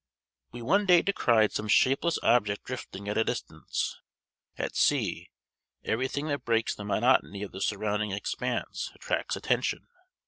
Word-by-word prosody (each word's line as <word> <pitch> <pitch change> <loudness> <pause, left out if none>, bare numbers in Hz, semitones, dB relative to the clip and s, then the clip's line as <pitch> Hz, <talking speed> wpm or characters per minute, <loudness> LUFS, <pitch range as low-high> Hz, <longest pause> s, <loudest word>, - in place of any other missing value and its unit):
We 120 0 -8
one 200 - +2
day 175 -2 +6
descried 115 - +3
some 105 - -3
shapeless 135 +9 +3
object 105 -4 +2
drifting 100 -6 -7
at 105 +2 0
a - - +4
distance. 80 -10 -3 0.6
At - - -3
sea, - - +1 0.5
every 120 +4 0
thing 145 +3 -3
that 145 -1 -2
breaks 115 -1 +1
the 105 - -8
monotony 105 -1 +2
of 100 - -6
the 95 - -8
surrounding 105 +1 -1
expanse 100 +1 -3
attracts - - -2
attention. - - -1
110 Hz, 145 wpm, -28 LUFS, 105-130 Hz, 0.6 s, day